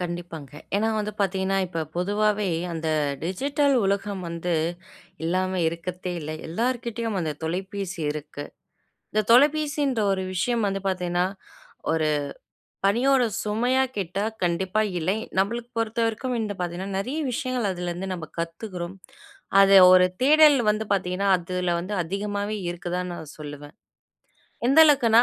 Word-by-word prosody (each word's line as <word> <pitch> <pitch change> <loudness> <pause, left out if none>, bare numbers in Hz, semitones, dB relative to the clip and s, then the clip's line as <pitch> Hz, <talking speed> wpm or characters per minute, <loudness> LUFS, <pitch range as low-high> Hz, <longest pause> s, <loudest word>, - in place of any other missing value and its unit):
கண்டிப்பாங்க. 175 -4 -6 0.3
ஏன்னா 220 +2 +1
வந்து 210 0 -2
பாத்தீங்கன்னா, 195 0 +1
இப்ப 165 -3 -3
பொதுவாவே 205 +2 +1 0.2
அந்த 160 -1 -3 0.4
டிஜிட்டல் 280 - +1
உலகம் 200 0 -1
வந்து 170 +1 -2 0.7
இல்லாம 185 +2 0
இருக்கத்தே 180 +2 -5
இல்லை. 155 0 -5
எல்லார்கிட்டயும் 230 +1 -2
அந்த 160 -3 -1
தொலைபேசி 190 +2 -4
இருக்கு. 145 -1 -7 0.7
இந்த 215 - +2
தொலைபேசின்ற 290 -1 +3
ஒரு 190 -1 -1
விஷயம் 230 +5 0
வந்து 195 0 -1
பாத்தீங்கன்னா, 180 -1 0 0.7
ஒரு 160 -1 +1 0.8
பணியோட 250 +5 +3 0.2
சுமையா 245 +5 +1
கேட்டா 195 +1 -2 0.2
கண்டிப்பா 185 +4 0 0.2
இல்லை. 180 +5 0 0.2
நம்பளுக்கு 235 +5 0
பொறுத்தவரைக்கும் 230 +2 -1
இந்த 210 -2 -3
பாத்தீங்கன்னா, 180 +2 -3
நிறைய 255 +10 -3
விஷயங்கள் 250 -3 -1
அதுலருந்து 180 +1 -4
நம்ப 165 -4 -7
கத்துக்குறோம். 175 +1 -5 0.7
அது 195 0 +7 0.2
ஒரு 180 0 +6 0.2
தேடல் 300 +1 +7
வந்து 215 +1 -1
பாத்தீங்கன்னா, 190 +1 -1
அதுல 180 0 -2
வந்து 190 +4 -4
அதிகமாவே 205 +3 -3
இருக்குதான்னு 175 +1 -4
நான் 155 -3 -10
சொல்லுவேன். 145 +1 -9 0.9
எந்த 275 +4 +4
அளவுக்குன்னா 235 -6 +5
195 Hz, 120 wpm, -25 LUFS, 175-225 Hz, 0.9 s, அது